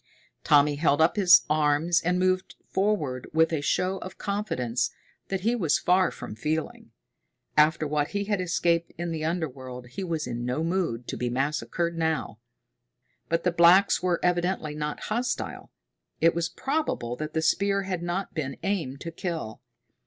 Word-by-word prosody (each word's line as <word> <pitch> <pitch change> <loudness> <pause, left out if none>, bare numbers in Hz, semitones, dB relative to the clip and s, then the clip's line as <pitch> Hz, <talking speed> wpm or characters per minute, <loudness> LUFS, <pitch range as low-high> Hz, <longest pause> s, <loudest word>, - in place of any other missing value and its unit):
Tommy 145 -1 +4
held 145 -1 +2
up 160 +1 +4
his 185 -4 +7
arms 155 +3 +2
and 180 +2 +1
moved 185 0 0
forward 175 -11 -1
with 160 +1 +3
a 155 - 0
show 185 +5 0
of 185 - -9
confidence 125 - -1 0.4
that 195 -1 -2
he 230 +5 +1
was 170 -10 +2
far 185 0 +3
from - - -8
feeling. 155 +8 -3 0.7
After 155 +1 +4
what 150 0 0
he 200 0 -2
had 205 -2 -1
escaped 170 -1 +1
in 170 0 -3
the 160 -1 -3
underworld 130 -7 -4
he 190 +10 -5
was 165 -4 -2
in 120 -1 -4
no 125 +6 -1
mood 165 -9 -1
to - - -4
be 125 - -1
massacred 155 +6 -1
now. 160 -9 -1 0.9
But 165 0 0
the 180 - +2
blacks 175 +4 +5
were 180 -2 +1
evidently 175 -3 0
not 150 0 -4
hostile. 240 +3 -3 0.5
It 165 0 +4
was 170 0 -1
probable 275 - -2
that 155 0 -5
the 160 - +2
spear 200 +3 +2
had 185 -2 -3
not 175 +3 -3
been 140 -5 -4
aimed 165 -9 -2
to 165 - -5
kill. 165 - -5
165 Hz, 165 wpm, -26 LUFS, 150-185 Hz, 0.9 s, his